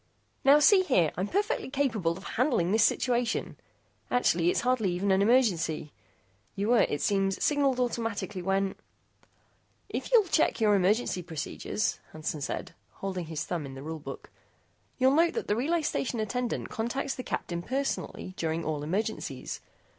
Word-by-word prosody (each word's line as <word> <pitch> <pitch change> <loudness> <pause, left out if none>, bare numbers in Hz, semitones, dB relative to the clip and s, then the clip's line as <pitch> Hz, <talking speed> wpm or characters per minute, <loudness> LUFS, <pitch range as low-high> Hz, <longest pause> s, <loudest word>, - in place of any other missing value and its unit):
"Now 280 +2 +7
see 375 +6 +6
here. 185 - +2
I'm 185 +4 -1
perfectly 415 - -1
capable 225 -12 0
of 190 - -11
handling 230 - +1
this 215 0 +4
situation. 235 - +1 0.5
Actually, 175 -8 +2
it's - - +1
hardly 245 -6 +1
even 195 +3 0
an 190 +1 +4
emergency. 195 - +2 0.6
You 200 +2 -1
were, 240 -1 +5
it 145 - -2
seems, 195 -1 +1
signaled 280 -3 +2
automatically 225 -5 -2
when 195 +1 0 0.6
" - - -38 0.3
"If - - -4
you'll 470 -3 +7
check 320 -6 +2
your 215 -2 +4
emergency 200 0 +2
procedures," 165 +5 -3
Hansen 155 -1 -4
said, - - -4 0.2
holding 185 -3 -4
his 155 -1 -3
thumb 170 -2 -3
in 135 -1 -8
the 135 - -8
Rule 160 +1 -5
Book, 150 - -9 0.7
"you'll 260 +1 +4
note 330 +3 +3
that 460 - -3
the 210 - +2
Relay 315 +8 0
Station 250 -5 -1
Attendant 240 +3 -2
contacts 265 +5 -2
the - - -5
Captain 170 -7 -3
personally 260 -4 -3
during 165 0 -2
all 155 -2 -2
emergencies. 170 - -3
210 Hz, 160 wpm, -29 LUFS, 175-255 Hz, 0.7 s, Now